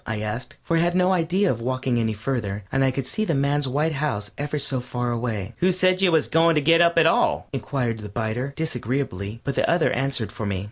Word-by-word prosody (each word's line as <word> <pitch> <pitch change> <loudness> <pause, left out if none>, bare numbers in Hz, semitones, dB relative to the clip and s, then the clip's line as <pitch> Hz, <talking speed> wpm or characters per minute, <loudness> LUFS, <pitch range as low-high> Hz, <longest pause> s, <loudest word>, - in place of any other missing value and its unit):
I 110 -1 -3
asked, 110 +3 -4
for 165 - 0
I - - +3
had 175 +1 +1
no 185 +1 +3
idea 180 +3 +2
of 115 - -4
walking 130 0 -1
any 110 -1 0
farther, 105 -3 -3
and 135 0 +2
I 135 - +4
could 130 0 -3
see 215 +11 -2
the 170 -8 0
man's 140 +1 +1
white 150 +5 0
house 125 -9 -2
ever 145 +1 -3
so 135 -2 0
far 125 0 -3
away. 115 -5 -3
"Who 185 +1 +3
said 185 +1 +2
you 185 -2 +4
was 160 -2 +3
goin' 165 0 +3
to - - +4
get 165 +4 +5
up 170 0 +3
at 165 - +6
all?" 165 - +2
inquired 125 -3 -2
the 105 -1 -8
biter, 120 +5 -3
disagreeably, 120 - -3
but 140 - -2
the - - +1
other 170 -1 +3
answered 135 -6 -1
for 110 -2 -5
me. 100 -2 -2
135 Hz, 240 wpm, -23 LUFS, 115-165 Hz, -, at